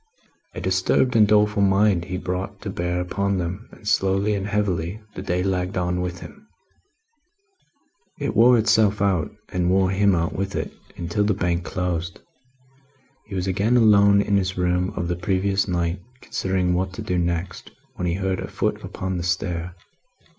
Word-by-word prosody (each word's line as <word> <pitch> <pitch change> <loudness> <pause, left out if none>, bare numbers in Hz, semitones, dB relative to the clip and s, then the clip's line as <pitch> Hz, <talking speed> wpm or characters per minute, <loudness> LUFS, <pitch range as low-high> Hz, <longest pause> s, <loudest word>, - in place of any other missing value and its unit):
A - - -4
disturbed 125 -1 +1
and 105 -2 +6
doleful 105 0 +3
mind 100 -2 +3
he 90 0 -4
brought 90 +1 -4
to - - -4
bear 90 +1 -2
upon 100 +2 -1
them, 90 +5 -4
and 105 - -13
slowly 95 0 +2
and 100 0 -2
heavily 100 -2 -1
the - - -6
day 90 -1 -1
lagged 95 -1 -1
on 90 0 0
with 90 0 -4
him. 210 +1 -12 1.7
It 140 -7 -3
wore 120 +3 +6
itself 110 -2 +3
out, 95 -5 +1 0.2
and 90 -1 0
wore 95 0 +3
him 100 0 +3
out 85 0 -1
with 95 +1 -3
it, - - -3 0.2
until 85 +4 -1
the 105 -2 +1
Bank 90 -2 -1
closed. 85 -2 -3 1.1
He 100 - -7
was 90 -1 -1
again 100 +6 +2
alone 100 -3 +5
in 100 -1 +2
his 95 -1 -1
room 90 0 +1
of 85 -3 -2
the 90 - -1
previous 95 +3 0
night, 85 0 -1 0.2
considering 95 -5 -1
what 95 +1 -1
to - - -6
do 90 -1 -1
next, 85 +1 -3 0.2
when 90 - -3
he 85 - 0
heard 95 -1 -1
a - - -4
foot - - -2
upon 95 0 -4
the 85 - -3
stair. 90 -1 -2
95 Hz, 175 wpm, -23 LUFS, 90-100 Hz, 1.7 s, and